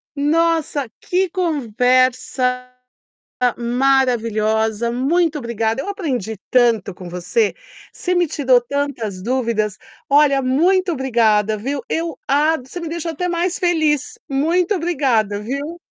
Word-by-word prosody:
Nossa 305 Hz, -2 st, +1 dB
que 370 Hz, +1 st, 0 dB
conversa 255 Hz, -, +1 dB, 0.9 s
maravilhosa, 235 Hz, -3 st, +1 dB
muito 305 Hz, +6 st, +1 dB
obrigada, 230 Hz, -1 st, -2 dB
eu 400 Hz, -, -6 dB
aprendi 250 Hz, -, -3 dB
tanto 230 Hz, -6 st, +2 dB
com 180 Hz, 0 st, -10 dB
você, 180 Hz, -, 0 dB, 0.4 s
você 360 Hz, 0 st, -2 dB
me 350 Hz, 0 st, +3 dB
tirou 260 Hz, -4 st, +3 dB
tantas 240 Hz, -7 st, -3 dB
dúvidas. 225 Hz, -3 st, -1 dB, 0.3 s
Olha, 280 Hz, -1 st, +4 dB
muito 350 Hz, +8 st, +2 dB
obrigada, 220 Hz, -6 st, +2 dB
viu. 270 Hz, +6 st, -3 dB
Eu 330 Hz, -3 st, -2 dB
a 300 Hz, +4 st, +3 dB
você 260 Hz, +6 st, -9 dB
me 335 Hz, -, -5 dB
deixou 335 Hz, 0 st, -3 dB
até 360 Hz, +3 st, -3 dB
mais 350 Hz, +1 st, -1 dB
feliz. 320 Hz, -, +1 dB
Muito 335 Hz, +8 st, +1 dB
obrigada, 265 Hz, -, 0 dB
viu. 280 Hz, +9 st, -4 dB
270 Hz, 115 wpm, -19 LUFS, 235-330 Hz, 0.9 s, Olha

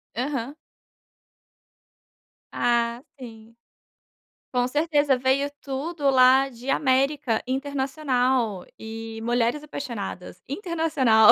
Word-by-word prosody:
Aham. 260 Hz, +2 st, -3 dB, 2.0 s
Ah, 235 Hz, 0 st, +1 dB, 0.2 s
sim. 225 Hz, -3 st, -11 dB, 1.0 s
Com 245 Hz, 0 st, +2 dB
certeza, 290 Hz, -1 st, +2 dB
veio 265 Hz, +3 st, +1 dB
tudo 285 Hz, +2 st, -2 dB
lá 265 Hz, +1 st, +5 dB
de 250 Hz, +1 st, -9 dB
América 265 Hz, -4 st, +2 dB
Internacional 260 Hz, -, 0 dB
e 225 Hz, 0 st, -7 dB
Mulheres 240 Hz, +4 st, +1 dB
Apaixonadas. 235 Hz, -, -6 dB
Internacional. 295 Hz, -, +4 dB
260 Hz, 80 wpm, -25 LUFS, 235-285 Hz, 2.0 s, lá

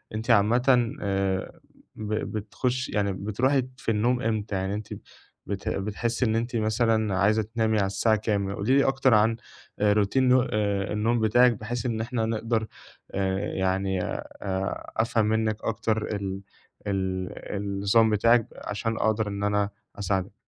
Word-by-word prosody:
أنتِ 115 Hz, +3 st, -1 dB
عامةً 120 Hz, +3 st, +4 dB
آآ 95 Hz, -2 st, -1 dB, 0.4 s
ب 110 Hz, 0 st, -4 dB
بتخشي 110 Hz, +4 st, -2 dB
يعني 100 Hz, -2 st, 0 dB
بتروحي 120 Hz, +8 st, +1 dB
في 115 Hz, -, -2 dB
النوم 120 Hz, +3 st, +1 dB
إمتى، 110 Hz, -4 st, -1 dB
يعني 95 Hz, +1 st, -1 dB
أنتِ 105 Hz, 0 st, -5 dB, 0.6 s
بت 100 Hz, -1 st, -3 dB
بتحسّي 110 Hz, +5 st, -1 dB
إن 110 Hz, -1 st, +1 dB
أنتِ 120 Hz, +2 st, -2 dB
مثلًا 110 Hz, -2 st, +1 dB
عايزة 105 Hz, +3 st, +3 dB
تنامي 110 Hz, 0 st, 0 dB
على 100 Hz, -, +2 dB
الساعة 105 Hz, +3 st, +2 dB
كام؟ 100 Hz, -2 st, -1 dB
قولي 125 Hz, +7 st, +2 dB
لي 140 Hz, -, +5 dB
أكتر 135 Hz, -2 st, +3 dB
عن 110 Hz, +1 st, +4 dB, 0.5 s
روتين 105 Hz, +5 st, +3 dB
نو 125 Hz, 0 st, +5 dB
الن 130 Hz, -, -4 dB, 0.4 s
النوم 115 Hz, +3 st, +1 dB
بتاعِك 120 Hz, +3 st, +5 dB
بحيث 115 Hz, +4 st, -5 dB
إن 115 Hz, -2 st, -1 dB
إحنا 115 Hz, -1 st, -1 dB
نقدر 110 Hz, 0 st, -1 dB, 0.4 s
آآ، 95 Hz, -1 st, 0 dB, 0.2 s
يعني 95 Hz, 0 st, 0 dB
أ -, -, -4 dB, 0.7 s
أفهم 110 Hz, -1 st, +2 dB
منِّك 110 Hz, 0 st, +1 dB
أكتر 110 Hz, -1 st, -1 dB
ال 95 Hz, -1 st, -4 dB, 0.5 s
ال 95 Hz, -2 st, -1 dB, 0.3 s
النظام 100 Hz, +3 st, +2 dB
بتاعِك 115 Hz, +2 st, +4 dB
عشان 115 Hz, +2 st, -3 dB
أقدر 110 Hz, 0 st, +1 dB
إن 100 Hz, 0 st, -4 dB
أنا 105 Hz, 0 st, +1 dB, 0.3 s
أساعدِك. 95 Hz, -1 st, -1 dB
110 Hz, 145 wpm, -26 LUFS, 100-115 Hz, 0.7 s, لي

